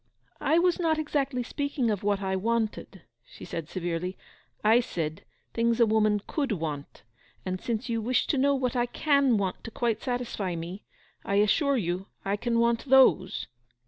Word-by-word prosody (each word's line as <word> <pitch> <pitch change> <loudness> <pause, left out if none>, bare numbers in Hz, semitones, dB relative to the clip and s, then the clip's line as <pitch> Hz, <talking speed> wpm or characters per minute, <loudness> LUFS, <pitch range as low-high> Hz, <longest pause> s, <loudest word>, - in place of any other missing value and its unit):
'I 320 - +2
was 355 +1 +3
not 325 -2 +2
exactly 280 -4 -1
speaking 280 -2 -1
of 205 - -2
what 200 -1 0
I 190 0 0
wanted,' 215 -3 -2 0.2
she - - -12
said 160 -2 -5
severely. 175 0 -3 0.5
'I 220 +3 +6
said, 165 -6 -3 0.3
things 230 0 +1
a 235 - +7
woman 215 -2 +2
could 280 -7 -1
want. 150 - -5 0.4
And 185 -1 -3
since 230 -1 -2
you 230 -2 -1
wish 245 +3 +1
to 290 - 0
know 280 +1 +3
what 255 -2 -1
I 245 0 +1
can 280 -3 +2
want 195 -2 -2
to - - -6
quite 230 -1 -1
satisfy 240 -7 -2
me, 170 +4 -7 0.4
I 200 - -1
assure 270 +8 +3
you 180 -2 -2 0.2
I 195 +1 +1
can 230 +3 -1
want 235 0 +2
those! 260 -8 +4
225 Hz, 175 wpm, -27 LUFS, 190-255 Hz, 0.5 s, a